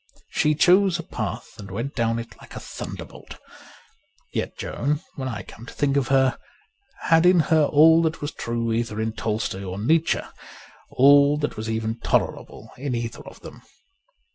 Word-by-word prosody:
She 150 0 +2
chose 185 +2 +4
a 170 - -6
path - - -6
and 100 -1 -9
went 115 +9 -4
down 115 -2 0
it 115 -3 -7
like - - -14
a - - -5
thunderbolt. - - -9 1.0
Yet - - -3
Joan, 145 +4 -2
when 130 -1 -5
I 120 -5 -5
come 115 +2 -13
to - - -10
think 140 -1 +1
of 140 -3 +1
her, 135 -1 +2 0.6
had 165 -1 +4
in 180 0 +5
her 155 -2 +5
all 160 +3 +6
that 160 -1 -1
was 145 0 -4
true 115 -1 -3
either 115 -2 -2
in 110 0 -1
Tolstoy 110 -3 -3
or 95 0 -5
Nietzsche 155 +10 +2 0.4
— - - -23
all 140 +2 +6
that 150 0 -2
was 110 +1 -5
even 110 +1 -2
tolerable - - -2
in 135 -2 -2
either 115 0 -4
of - - -13
them. - - -11
130 Hz, 175 wpm, -23 LUFS, 115-150 Hz, 1.0 s, all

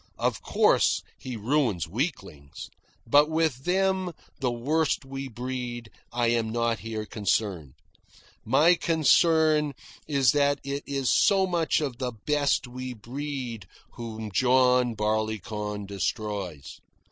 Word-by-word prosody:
Of - - -1
course, - - +3 0.2
he 130 -2 -6
ruins 110 - 0
weaklings; 95 - -5 0.3
but 145 +6 +5
with 160 -5 0
them, 190 -1 +1 0.3
the 130 -3 0
worst 145 +5 0
we 135 0 -6
breed, 120 -2 -5 0.2
I 120 -1 +1
am 115 -1 +1
not 115 0 0
here 110 -1 -5
concerned. 100 - -2 0.7
My 150 +9 +5
concern 160 -2 +3 0.3
is 140 -6 +3
that 145 -1 +2
it 140 +1 -3
is 135 -2 0
so 195 -2 +4
much 170 -3 +1
of 135 -5 -3
the 125 -2 -2
best 145 -2 +1
we 125 0 -7
breed 120 -3 -6 0.2
whom 110 -2 -7
John 125 +1 +3
Barleycorn 105 -1 -2
destroys. 100 - -4
125 Hz, 120 wpm, -27 LUFS, 110-145 Hz, 0.7 s, but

